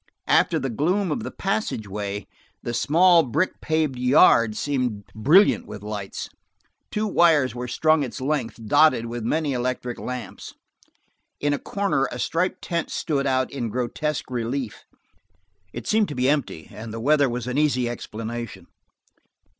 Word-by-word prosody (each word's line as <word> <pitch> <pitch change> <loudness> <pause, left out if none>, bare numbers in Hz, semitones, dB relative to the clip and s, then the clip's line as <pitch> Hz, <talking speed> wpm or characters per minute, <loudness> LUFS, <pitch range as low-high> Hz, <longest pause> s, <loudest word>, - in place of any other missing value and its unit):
After - - +3
the 135 - -2
gloom 175 - 0
of - - -1
the - - -5
passageway, 105 - -3 0.4
the 120 - -3
small 170 +7 +5
brick 155 +6 -1
paved 155 -5 0
yard 120 -4 +5
seemed 125 -8 -2
brilliant 155 - +4
with 105 - -9
lights. 105 -2 -5 0.6
Two 210 +1 -1
wires 165 -9 +3
were 125 0 -5
strung 155 +5 +2
its 135 -1 -4
length, 130 -5 -2
dotted 125 +1 +4
with 120 0 -5
many 150 +4 0
electric 125 -1 -3
lamps. 125 -5 -7 0.8
In 145 0 +1
a 145 - -1
corner 200 -9 0
a - - -5
striped 165 +8 -1
tent 170 -2 -2
stood 140 -3 -1
out 130 -1 +1
in 125 -5 -3
grotesque 130 +5 -3
relief; 120 0 -3 0.9
it 120 +1 -7
seemed 215 -1 +2
to 145 - -6
be 125 +1 +1
empty, 135 - -1
and 110 +1 -8
the 115 - -5
weather 145 +2 +3
was 120 0 -4
an 125 +3 -1
easy 130 -5 +2
explanation. 115 -1 -6
130 Hz, 150 wpm, -24 LUFS, 115-155 Hz, 0.9 s, small